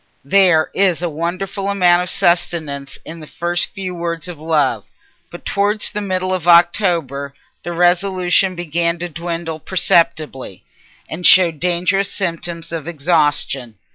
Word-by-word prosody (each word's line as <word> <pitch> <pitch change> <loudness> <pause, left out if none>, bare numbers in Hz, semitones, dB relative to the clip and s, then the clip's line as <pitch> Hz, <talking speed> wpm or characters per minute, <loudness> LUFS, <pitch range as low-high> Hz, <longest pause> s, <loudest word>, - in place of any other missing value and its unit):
There 175 -1 +3
is 185 -3 +2
a 175 - 0
wonderful 185 +5 -3
amount 180 -3 +3
of 180 - -4
sustenance 155 -5 -1
in 165 +1 -8
the 155 - -11
first 175 +2 -2
few 190 -2 -6
words 170 -1 -4
of 175 -4 -8
love. 150 -9 0 0.4
But - - -12
towards 205 +1 0
the 210 - -4
middle 185 -1 -2
of 180 -2 -3
October 170 -6 +2 0.3
the 175 - -5
resolution 180 +1 +2
began 170 0 -1
to 175 +1 -5
dwindle 170 0 -5
perceptibly, 160 - 0 0.4
and 175 +3 -7
showed 175 -4 +6
dangerous 180 +3 0
symptoms 170 -3 -4
of 165 -2 -5
exhaustion. 145 -7 0
170 Hz, 140 wpm, -17 LUFS, 160-185 Hz, 0.4 s, showed